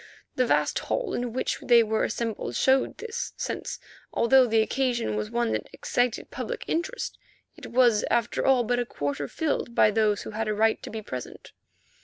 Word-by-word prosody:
The 255 -1 +2
vast - - +2
hall 475 -6 -2
in 245 -1 -2
which 255 - -2
they 235 -1 +6
were 220 0 0
assembled 225 - -3
showed 265 0 +2
this, 460 +1 -5
since, - - -4 0.3
although 255 +2 +5
the 225 -1 +3
occasion 240 - -1
was 105 0 -2
one 120 -1 0
that 110 -1 -3
excited 245 -1 -1
public - - -5
interest, 370 +10 -3 0.4
it - - -10
was 240 -4 +4
after 235 -1 +1
all 265 -2 +4
but 245 +2 0
a 245 - 0
quarter 145 -4 -3
filled 285 - -2
by 215 - +5
those 210 -1 +1
who - - -7
had 220 +1 -3
a 215 - 0
right 220 +1 +2
to - - -7
be 220 0 -6
present. 130 -10 -8
235 Hz, 185 wpm, -26 LUFS, 215-255 Hz, 0.4 s, they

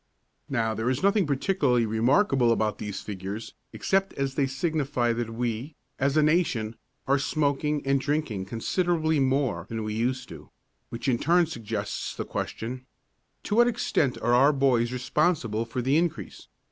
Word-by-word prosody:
Now, 115 -4 0
there 110 +2 -1
is 130 +6 -1
nothing 200 -3 +3
particularly 140 -4 +1
remarkable 120 - +3
about 110 -2 0
these 105 -2 -5
figures 100 +2 -6 0.2
except 190 - 0
as 135 -1 -2
they 135 -1 +1
signify 135 -4 0
that 115 -1 -3
we, 120 +5 -3 0.2
as 140 +2 +1
a 155 - +5
nation, 150 -9 +1 0.3
are 140 +1 +3
smoking 145 0 0
and 135 0 +2
drinking 140 -10 -1
considerably 160 - 0
more 130 - 0
than 115 -1 -3
we 105 0 -3
used 125 +4 -1
to, - - -11 0.4
which 115 0 -5
in 120 -3 +2
turn 175 +2 +4
suggests 110 -8 -4
the - - -4
question: 125 +3 -5 0.6
To 210 - -1
what 240 0 +6
extent 220 - 0
are 120 - +3
our 135 +4 +6
boys 130 -4 +2
responsible 125 -3 0
for 120 +2 -4
the 135 +3 +2
increase? 170 0 -3
130 Hz, 160 wpm, -26 LUFS, 115-150 Hz, 0.6 s, what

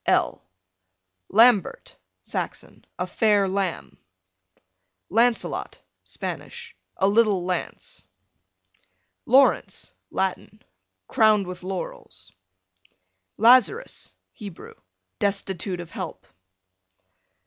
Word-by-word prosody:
L - - +1 0.9
Lambert, 225 -1 +3 0.3
Saxon, - - -6
a - - -1
fair 210 -3 +2
lamb. 190 -2 -3 1.1
Lancelot, 230 +3 +1 0.2
Spanish, - - -7 0.2
a 190 - +3
little 205 -3 +3
lance. 175 - -4 1.2
Laurence, 270 +3 +3 0.2
Latin, 190 +2 -3 0.4
crowned 215 -3 +4
with 180 0 -7
laurels. 100 - -7 1.1
Lazarus, 255 - +4 0.2
Hebrew, 200 -7 -10 0.5
destitute 195 -2 -1
of 170 -2 -8
help. - - -7
200 Hz, 70 wpm, -24 LUFS, 185-225 Hz, 1.2 s, crowned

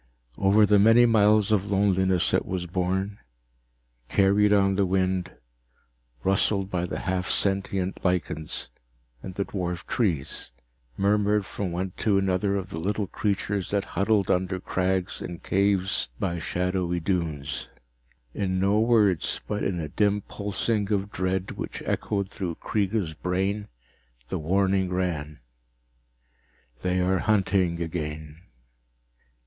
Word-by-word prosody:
Over 100 +2 +5
the 105 0 +4
many 115 +4 +6
miles 105 -2 +4
of 100 -1 +1
loneliness 95 -2 +2
it - - +3
was 90 -1 -3
borne, 95 +3 -2 0.9
carried 100 +1 +4
on 100 -1 +4
the 100 0 +2
wind, 95 -1 0 0.9
rustled 95 0 +1
by 90 -1 -1
the - - -4
half 90 -1 -2
sentient 95 -1 0
lichens 80 -7 -2 0.5
and 95 - -8
the 100 - 0
dwarfed 90 -3 -4
trees, 85 - -2 0.4
murmured 105 0 +2
from 95 -1 -4
one 90 +2 -2
to 105 -3 +2
another 95 +1 +1
of 100 0 -4
the 80 - -4
little 100 +4 -1
creatures 100 0 -2
that 100 -1 0
huddled 100 -1 +2
under 95 +1 0
crags, 95 0 -1
in 90 -1 -5
caves, 100 +2 +1
by 85 -4 -1
shadowy 90 0 -1
dunes. 80 -5 -2 0.7
In 95 -2 -1
no 100 +2 +3
words, 110 -7 +2
but 105 0 -2
in 90 -3 -1
a 80 - -3
dim 105 +6 +1
pulsing 105 +1 -2
of 100 0 0
dread 95 +1 -1
which - - -6
echoed 100 -2 -1
through 90 -4 -4
Kreega's 100 -4 -1
brain, 95 +5 -2 0.6
the - - -2
warning 95 +3 +1
ran 80 -5 -2 1.4
_They 90 0 +1
are 95 0 +2
hunting 95 -4 +1
again. 80 -1 -5
95 Hz, 130 wpm, -26 LUFS, 90-100 Hz, 1.4 s, many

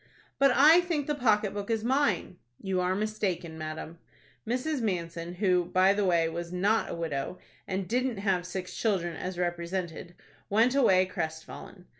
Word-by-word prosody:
"But 275 0 +6
I 315 +5 +7
think 335 -5 -2
the 295 - -1
pocket 215 -7 +2
book 205 +1 -5
is 225 -1 0
mine." 235 - 0 0.2
"You 190 -2 -1
are 180 +1 +1
mistaken, 190 -6 -2
madam." 155 +1 -7 0.5
Mrs. 255 +4 -1
Manson, 170 -4 -3
who, 180 -2 +2
by 185 +2 +4
the 205 0 0
way, 170 -3 +3
was 170 +1 -5
not 200 +5 +1
a - - -4
widow, 160 0 -3 0.3
and 190 -1 -3
didn't 250 0 0
have 190 -3 0
six 185 0 -5
children 180 -7 0
as 185 +2 -5
represented, 175 0 -3 0.3
went 225 +5 +3
away 190 -9 +4
crestfallen. 165 +2 -6
185 Hz, 160 wpm, -29 LUFS, 175-220 Hz, 0.5 s, I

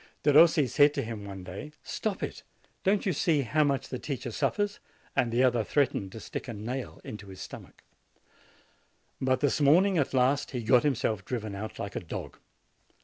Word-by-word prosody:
Derossi 155 0 +6
said 145 +4 +4
to - - -1
him 110 -3 -6
one 95 -2 -7
day, 100 +12 -8
"Stop 210 -3 -3
it! - - -4 0.4
don't 200 +1 +2
you 190 - +2
see 155 0 +2
how 150 +6 +2
much 140 -2 0
the 125 - -4
teacher 130 -4 -4
suffers?" 205 - -1 0.4
and 120 - +2
the 120 +3 +3
other 120 -3 +3
threatened 110 -8 0
to 115 - -7
stick - - -6
a 120 - -4
nail 120 +5 -5
into 105 -2 -8
his 95 -1 -10
stomach. - - -10 1.4
But 130 -1 +1
this 145 +1 +1
morning, 175 +6 +5
at 135 -1 0
last, 130 +3 +2
he 125 -2 -3
got 120 +2 +5
himself 120 -8 0
driven 110 -2 -4
out 110 +2 -6
like 100 0 -5
a - - 0
dog. 85 - -7
130 Hz, 185 wpm, -29 LUFS, 110-150 Hz, 1.4 s, Derossi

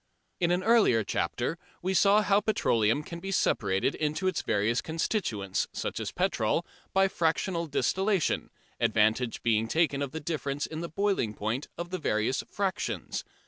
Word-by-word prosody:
In 175 - +2
an 180 +1 +1
earlier 215 - +4
chapter 125 +9 -2 0.2
we 190 +1 0
saw 200 +3 +5
how 200 0 +4
petroleum 115 - +2
can 170 +2 -7
be 195 +2 -5
separated 100 - +1
into 155 +4 -2
its 185 - 0
various 105 +4 +1
constituents, 140 - -1
such - - -3
as - - -3
petrol, - - 0 0.3
by 195 0 +4
fractional 170 0 0
distillation, 190 +5 +1 0.3
advantage 110 +3 +2
being 115 -1 +2
taken 155 0 +1
of 140 -2 -2
the 160 - -4
difference 145 -2 -2
in 160 0 -6
the 170 - -4
"boiling 190 - 0
point" 110 +7 -2
of 175 +1 -5
the 185 - -2
various 110 -2 0
"fractions." 195 0 -2
160 Hz, 155 wpm, -29 LUFS, 115-190 Hz, 0.3 s, saw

